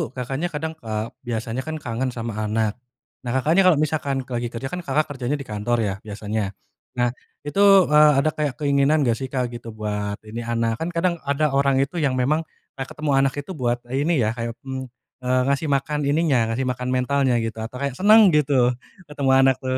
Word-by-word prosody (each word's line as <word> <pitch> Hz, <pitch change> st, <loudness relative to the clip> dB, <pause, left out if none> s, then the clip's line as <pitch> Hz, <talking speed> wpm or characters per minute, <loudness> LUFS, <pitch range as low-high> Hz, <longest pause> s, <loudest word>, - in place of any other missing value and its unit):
Kakaknya 135 Hz, +6 st, -2 dB
kadang, 160 Hz, 0 st, -4 dB
eee, 110 Hz, 0 st, -4 dB, 0.2 s
biasanya 115 Hz, +1 st, -3 dB
kan 160 Hz, -, -3 dB
kangen 130 Hz, -3 st, -3 dB
sama 115 Hz, -2 st, -4 dB
anak. 110 Hz, +1 st, -1 dB, 0.4 s
Nah, 120 Hz, -2 st, -5 dB
Kakaknya 165 Hz, +8 st, +4 dB
kalau 180 Hz, -, +6 dB
misalkan 145 Hz, -3 st, -1 dB
ka 125 Hz, -2 st, -4 dB
lagi 120 Hz, -, -2 dB
kerja 120 Hz, +3 st, -5 dB
kan 180 Hz, -, -3 dB
Kakak 150 Hz, -2 st, -1 dB
kerjanya 135 Hz, +1 st, -2 dB
di 140 Hz, -, -6 dB
kantor 105 Hz, +3 st, 0 dB
ya, 100 Hz, -2 st, -1 dB
biasanya? 105 Hz, -1 st, -4 dB, 0.4 s
Nah, 120 Hz, -1 st, +1 dB, 0.3 s
itu, 145 Hz, +7 st, -3 dB, 0.3 s
eee, 150 Hz, 0 st, +7 dB
ada 155 Hz, -, +3 dB
kayak 145 Hz, -5 st, -2 dB
keinginan 140 Hz, +1 st, +3 dB
gak 120 Hz, -3 st, +1 dB
sih 135 Hz, -, -3 dB
Kak 125 Hz, -2 st, -2 dB
gitu, 115 Hz, -2 st, -8 dB
buat 105 Hz, -1 st, -3 dB
ini, 110 Hz, +2 st, -7 dB
anak? 115 Hz, -1 st, 0 dB
Kan 165 Hz, -, -2 dB
kadang, 170 Hz, 0 st, +1 dB
ada 145 Hz, +1 st, +1 dB
orang 135 Hz, -1 st, +3 dB
itu 145 Hz, +5 st, -4 dB
yang 140 Hz, -4 st, +1 dB
memang, 150 Hz, +6 st, 0 dB, 0.3 s
eee, 135 Hz, -, -2 dB
ketemu 155 Hz, -2 st, -3 dB
anak 135 Hz, 0 st, +2 dB
itu -, -, -9 dB
buat 125 Hz, -8 st, 0 dB, 0.2 s
ini 145 Hz, -1 st, +1 dB
ya, 110 Hz, -, +1 dB, 0.3 s
mmm, 130 Hz, -1 st, -5 dB, 0.3 s
eee, 125 Hz, 0 st, +2 dB
ngasih 140 Hz, +2 st, 0 dB
makan 145 Hz, +2 st, 0 dB
ininya 140 Hz, -7 st, +2 dB
ngasih 125 Hz, +4 st, -1 dB
makan 125 Hz, 0 st, -2 dB
mentalnya 130 Hz, 0 st, +1 dB
gitu 110 Hz, 0 st, -5 dB
atau 115 Hz, +3 st, -6 dB
kayak 140 Hz, -1 st, -2 dB
senang 205 Hz, +3 st, +6 dB
gitu, 135 Hz, -4 st, +3 dB, 0.3 s
ketemu 145 Hz, -2 st, -2 dB
anak 135 Hz, -1 st, +5 dB
tuh. 130 Hz, 0 st, -1 dB
130 Hz, 195 wpm, -23 LUFS, 120-150 Hz, 0.4 s, eee